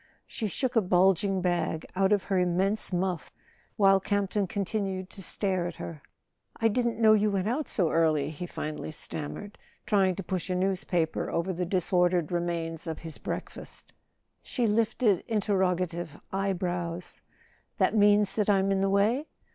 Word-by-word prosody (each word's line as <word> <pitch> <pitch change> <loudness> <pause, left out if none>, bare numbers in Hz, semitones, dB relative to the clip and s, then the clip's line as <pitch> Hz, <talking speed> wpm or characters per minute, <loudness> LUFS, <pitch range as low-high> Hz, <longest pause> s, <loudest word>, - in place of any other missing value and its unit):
She 220 - -4
shook 255 +5 -2
a 225 - +5
bulging 190 +1 +3
bag 175 -3 0
out 195 +1 +2
of 205 -2 +3
her 195 -2 0
immense 190 +4 +1
muff, 180 -2 -2 0.4
while 195 -1 +5
Campton 200 0 0
continued 195 -1 -3
to 195 - -10
stare 185 -1 0
at 175 - -6
her. 155 -3 -7 0.6
"I 225 - +3
didn't 235 +1 0
know 220 -1 +6
you 210 0 +3
went 195 -1 -1
out 270 +7 -1
so 175 -6 0
early," 155 -3 +2
he 165 +3 -6
finally 155 -2 -5
stammered, 155 +6 -6 0.3
trying 195 -4 +3
to 195 - -5
push 185 +1 -3
a 185 - 0
newspaper 180 -3 0
over 170 +3 -1
the 180 0 -2
dis¬ 185 0 -1
ordered 175 -2 +3
remains 170 -1 -2
of 160 - -3
his 165 -2 -7
breakfast. - - -6 0.5
She 245 - -1
lifted 220 -2 +2
interrogative 180 -6 0
eye 195 0 0
brows. 175 -1 -4 0.6
"That - - +2
means 205 -1 +4
that 210 -1 0
I'm 195 -1 +3
in 195 0 +1
the 195 - +2
way?" 220 +10 +2
190 Hz, 165 wpm, -28 LUFS, 175-205 Hz, 0.6 s, know